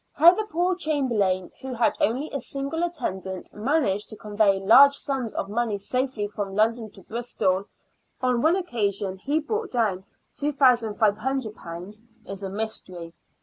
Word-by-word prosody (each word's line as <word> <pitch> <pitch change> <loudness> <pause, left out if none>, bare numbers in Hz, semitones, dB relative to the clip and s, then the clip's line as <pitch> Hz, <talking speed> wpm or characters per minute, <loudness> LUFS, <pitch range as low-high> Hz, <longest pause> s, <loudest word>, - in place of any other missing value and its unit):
How 330 +4 +8
the 430 +3 -3
poor 355 +3 +1
Chamberlain, 235 - 0
who 260 -1 -5
had 230 -2 +2
only 260 +8 0
a 280 - -2
single 275 +5 -3
attendant, 190 - -4
managed 210 -4 0
to - - -9
convey 205 -2 +1
large 260 +8 +7
sums 265 -5 -3
of - - -2
money 220 0 -1
safely 250 +1 -2
from 205 -2 -5
London 220 +1 +1
to 195 - -15
Bristol 210 -5 -1 0.5
(on 250 -2 +1
one 320 +5 +4
occasion 205 - -2
he 285 +9 0
brought 430 +7 -3
down 210 -6 0 0.3
;^2,5oo) 220 - 0 0.3
is 195 0 -7
a 195 - -4
mystery. 185 -5 -3
225 Hz, 145 wpm, -25 LUFS, 200-275 Hz, 0.5 s, How